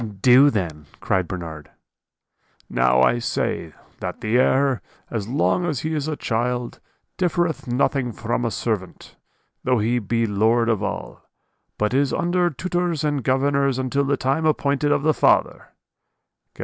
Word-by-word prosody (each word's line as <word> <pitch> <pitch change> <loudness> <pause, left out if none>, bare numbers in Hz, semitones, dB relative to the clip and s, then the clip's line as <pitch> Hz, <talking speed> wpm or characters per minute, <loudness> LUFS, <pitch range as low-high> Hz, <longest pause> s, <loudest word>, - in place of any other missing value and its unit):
"'Do 120 +6 +5
then!' 85 - -3
cried 95 -2 0
Bernard. 80 -5 -7 1.0
"'Now 65 +1 +3
I 120 - +3
say, 80 -8 -2 0.3
that - - -5
the 115 +3 +1
heir, 135 0 +2 0.3
as 110 -4 -3
long 145 +7 +1
as 155 -7 -2
he 160 +1 -2
is 150 -1 -2
a 155 - -2
child, 120 0 -2 0.4
differeth 175 -4 0
nothing 125 0 0
from 115 +2 -3
a 115 - 0
servant, 105 -5 -4 0.5
though 125 -1 +2
he 115 +3 +1
be 115 +2 0
lord 115 +3 +2
of 110 -4 +1
all; - - -6 0.5
but 105 +2 0
is 140 0 +2
under 175 0 +1
tutors 175 +1 -2
and 145 -3 -1
governors 140 +1 +1
until 130 +2 0
the 140 0 0
time 140 +5 0
appointed 145 -1 +1
of 145 - +1
the 155 0 +3
father' - - +2 0.9
(Gal. - - -25
125 Hz, 150 wpm, -22 LUFS, 110-145 Hz, 1.0 s, Do